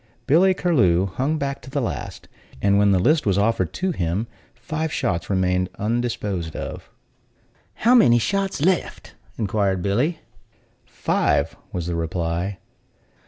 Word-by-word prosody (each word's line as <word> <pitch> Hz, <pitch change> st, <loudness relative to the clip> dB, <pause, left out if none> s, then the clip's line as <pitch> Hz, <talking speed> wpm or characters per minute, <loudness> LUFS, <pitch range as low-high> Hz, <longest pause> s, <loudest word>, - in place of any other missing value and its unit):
Billy 185 Hz, +6 st, +4 dB
Curlew 100 Hz, -, +3 dB
hung 130 Hz, -, -1 dB
back 140 Hz, -2 st, -3 dB
to -, -, -11 dB
the 140 Hz, +1 st, -2 dB
last; 120 Hz, -, -5 dB, 0.3 s
and 100 Hz, +6 st, +3 dB
when 100 Hz, 0 st, +4 dB
the 95 Hz, -, +4 dB
list 145 Hz, -, +2 dB
was 100 Hz, -1 st, +2 dB
offered 100 Hz, -5 st, 0 dB
him, 105 Hz, -, -1 dB, 0.3 s
five 155 Hz, +6 st, -3 dB
shots 100 Hz, -, -2 dB
remained 90 Hz, -1 st, +1 dB
undisposed 105 Hz, -7 st, -2 dB
of. -, -, -6 dB, 0.9 s
"How 235 Hz, +3 st, +3 dB
many 120 Hz, -, +6 dB
shots 195 Hz, -, -1 dB
left?" 185 Hz, +1 st, -1 dB, 0.2 s
inquired 100 Hz, -3 st, 0 dB
Billy. 125 Hz, -, +1 dB, 0.7 s
"Five," 125 Hz, -1 st, 0 dB, 0.2 s
was 90 Hz, -3 st, -3 dB
the 85 Hz, -, -2 dB
reply. 85 Hz, +3 st, -2 dB
105 Hz, 130 wpm, -22 LUFS, 95-150 Hz, 0.9 s, many